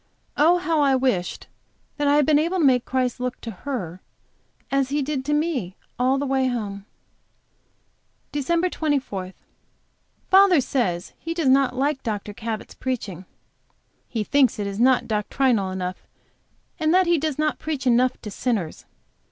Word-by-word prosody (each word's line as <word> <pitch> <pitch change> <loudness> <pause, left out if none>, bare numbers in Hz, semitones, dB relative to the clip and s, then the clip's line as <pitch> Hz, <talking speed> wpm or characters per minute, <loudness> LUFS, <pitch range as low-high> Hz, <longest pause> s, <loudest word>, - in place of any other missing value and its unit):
Oh, 335 +4 +5
how 330 -3 +1
I 275 -2 +4
wished 250 -9 -1 0.5
that 290 -1 0
I 285 - +4
had 295 -1 +4
been 295 0 +4
able 340 +4 0
to 330 - +3
make 250 -3 +4
Christ 255 -1 -1
look 250 0 -3
to 230 - -6
her 190 - -5 0.7
as 275 -1 +1
He 290 +1 0
did 275 -1 -2
to 295 - 0
me 285 - -1 0.2
all 260 +2 +3
the 285 - -1
way 265 -1 +1
home. 205 -5 -4 1.5
DEC. 340 +5 0
24. 260 - -2 0.9
Father 380 -3 +6
says 200 -10 -1
he 330 0 -5
does 320 -6 +1
not 265 -1 +3
like 275 +1 0
Dr. 210 -2 -4
Cabot's 220 +1 -5
preaching. 205 -9 -4 0.8
He 225 -3 -2
thinks 265 +1 +3
that 205 - -3
it 200 - -3
is 200 - -6
not 255 +1 +3
doctrinal 215 -1 +1
enough, 185 -1 -5 0.7
and 315 -1 +2
that 375 0 +5
he 340 -2 +3
does 305 -2 -2
not 305 0 0
preach 295 -4 -4
enough 250 +1 +3
to 210 - -6
sinners. 200 -7 -2
260 Hz, 160 wpm, -23 LUFS, 215-295 Hz, 1.5 s, Father